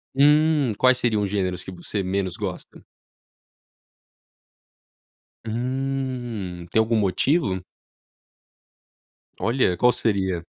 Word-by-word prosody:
Hum, 150 -2 +4
quais 130 0 +4
seriam 110 -4 +1
os 100 - -1
gêneros 95 -3 -2
que 95 - -8
você 90 +3 -4
menos 95 -1 -2
gosta? 95 -4 -7 2.6
Hum, 120 -6 -3
tem 110 - +2
algum 110 +1 +2
motivo? 100 - +1 1.8
Olha, 115 -6 +1
qual 125 +6 +5
seria? 95 -7 -1
110 Hz, 90 wpm, -23 LUFS, 95-130 Hz, 2.6 s, qual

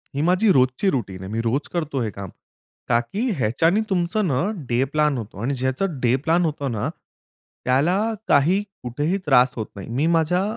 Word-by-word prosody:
ही 140 - 0
माझी 180 +6 +3
रोजची 130 +8 +2
रुटीन 100 -8 -3
आहे. 95 - -7
मी 115 +1 -1
रोज 120 +5 -1
करतो 155 -6 -2
हे 115 - -1
काम, 100 -2 -8 0.6
का 120 -1 +4
की 205 - -2
ह्याच्याने 160 - +2
तुमचं 185 +2 0
ना, 130 -4 +1 0.3
डे 120 +2 +2
प्लान 150 -3 +2
होतो 105 -3 -7
आणि 130 +5 -1
ज्याचं 130 +5 -1
डे 120 0 +3
प्लान 170 +2 +3
होतो 150 -3 -2
ना, 105 - -1 0.8
त्याला 140 +9 +2 0.3
काही 170 +8 +4 0.2
कुठेही 145 +10 -1
त्रास 125 -2 +5
होत 110 - -3
नाही. 100 +1 -8
मी 145 +5 +2
माझ्या 180 +4 +1
140 Hz, 180 wpm, -22 LUFS, 120-170 Hz, 0.8 s, त्रास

